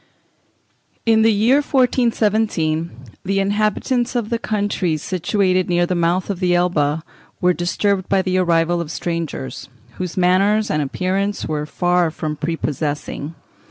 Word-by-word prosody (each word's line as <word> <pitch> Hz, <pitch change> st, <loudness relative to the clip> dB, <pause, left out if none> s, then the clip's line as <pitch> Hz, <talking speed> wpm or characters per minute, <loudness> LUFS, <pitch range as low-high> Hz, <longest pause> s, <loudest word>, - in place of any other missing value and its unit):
In 225 Hz, -1 st, +4 dB
the 225 Hz, 0 st, +5 dB
year 220 Hz, +6 st, +4 dB
1417 220 Hz, -, +1 dB, 0.3 s
the 195 Hz, +1 st, 0 dB
inhabitants 215 Hz, +5 st, 0 dB
of 235 Hz, -2 st, -1 dB
the 235 Hz, -, 0 dB
countries 200 Hz, -8 st, -1 dB
situated 185 Hz, 0 st, 0 dB
near 175 Hz, 0 st, +2 dB
the 180 Hz, -, -1 dB
mouth 175 Hz, +3 st, 0 dB
of 190 Hz, -, -5 dB
the 180 Hz, -2 st, +2 dB
Elbe 160 Hz, -3 st, +1 dB, 0.4 s
were 180 Hz, 0 st, +3 dB
disturbed 185 Hz, +2 st, -1 dB
by 195 Hz, -1 st, +2 dB
the 185 Hz, 0 st, +1 dB
arrival 170 Hz, -1 st, +2 dB
of 165 Hz, -, -6 dB
strangers, 165 Hz, -5 st, -4 dB, 0.3 s
whose 180 Hz, -1 st, -4 dB
manners 195 Hz, +4 st, +3 dB
and 150 Hz, -, +1 dB
appearance 190 Hz, +7 st, -1 dB
were 150 Hz, -1 st, -3 dB
far 175 Hz, +1 st, +1 dB
from 155 Hz, -1 st, -4 dB
pre 165 Hz, +2 st, -2 dB
possessing. 150 Hz, 0 st, -4 dB
180 Hz, 140 wpm, -20 LUFS, 165-205 Hz, 0.4 s, the